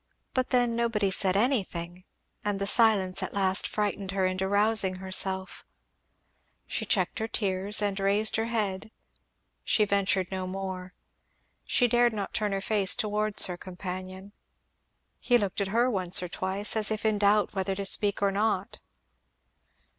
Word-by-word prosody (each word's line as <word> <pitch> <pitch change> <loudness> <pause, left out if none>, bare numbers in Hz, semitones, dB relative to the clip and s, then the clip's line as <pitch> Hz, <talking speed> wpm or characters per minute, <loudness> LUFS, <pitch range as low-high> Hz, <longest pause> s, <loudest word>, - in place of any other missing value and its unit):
But 255 -1 -1
then 245 -2 +1
nobody 225 -4 0
said 190 0 +2
anything; 185 -7 -2 0.4
and 205 -2 -2
the 200 - -1
silence 200 -4 +3
at - - -5
last 190 -1 +2
frightened 205 -2 -3
her 190 -1 +1
into 185 +1 -1
rousing 205 -1 +2
herself 190 0 -2 1.0
She - - -4
checked - - 0
her 220 - -2
tears 200 0 -1
and 200 -1 -1
raised 200 +2 +2
her 225 +1 -1
head; 210 -4 -2 0.7
she 210 - +2
ventured 195 -2 0
no 185 -1 -3
more; 185 0 -6 0.7
she 245 - +2
dared 240 0 +3
not 205 -2 -5
turn 210 -1 -1
her 195 0 -2
face 200 -2 +2
towards 215 -2 +3
her 180 -1 -5
companion. 185 +2 -8 0.9
He 245 - +3
looked 200 -3 -2
at 200 - -1
her 235 +5 +2
once 185 -6 +2
or - - -3
twice, 195 +4 -1
as 215 -1 +2
if 215 0 -3
in 215 -1 +1
doubt 205 0 +2
whether 195 -1 -2
to 200 0 -4
speak 205 +1 +2
or 200 - +3
not. 200 -1 -1
200 Hz, 155 wpm, -27 LUFS, 190-215 Hz, 1.0 s, silence